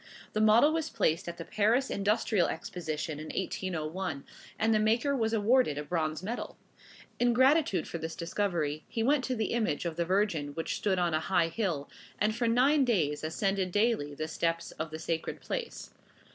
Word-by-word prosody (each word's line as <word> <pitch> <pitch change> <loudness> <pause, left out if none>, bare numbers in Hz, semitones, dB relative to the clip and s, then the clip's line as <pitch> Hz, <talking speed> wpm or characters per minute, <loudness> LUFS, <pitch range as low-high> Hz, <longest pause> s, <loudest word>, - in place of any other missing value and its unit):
The 215 - +1
model 225 +8 +6
was 325 -1 -1
placed 160 +2 0
at 170 - -7
the 165 - -7
Paris 230 +6 +1
Industrial 205 -2 +1
Exposition 155 -3 -4
in 155 - -7
1801; 175 -4 -3 0.3
and 225 +1 +2
the 215 - +3
maker 230 +6 +2
was 225 -4 0
awarded 225 - +3
a 150 - -3
bronze 155 0 -2
medal. 230 +5 -5 0.6
In 245 0 +3
gratitude 260 - +3
for 170 - -5
this 160 +1 -5
discovery 170 -4 -2
he 225 - -2
went 275 +2 +3
to 255 - -1
the 220 -1 -1
image 220 -10 0
of 165 -2 -3
the 170 - +2
Virgin 170 -6 0
which 165 - -2
stood 195 -3 0
on 175 -2 +1
a 155 - +2
high 165 -1 +1
hill, 165 -6 -2 0.3
and 215 +1 +1
for 235 0 0
nine 265 +5 +4
days 160 - +1
ascended 190 +3 -1
daily 205 -9 +1
the 155 +2 -3
steps 165 +1 -1
of 155 +1 -5
the 155 - -6
sacred 160 0 -3
place. - - -5
190 Hz, 185 wpm, -30 LUFS, 160-230 Hz, 0.6 s, model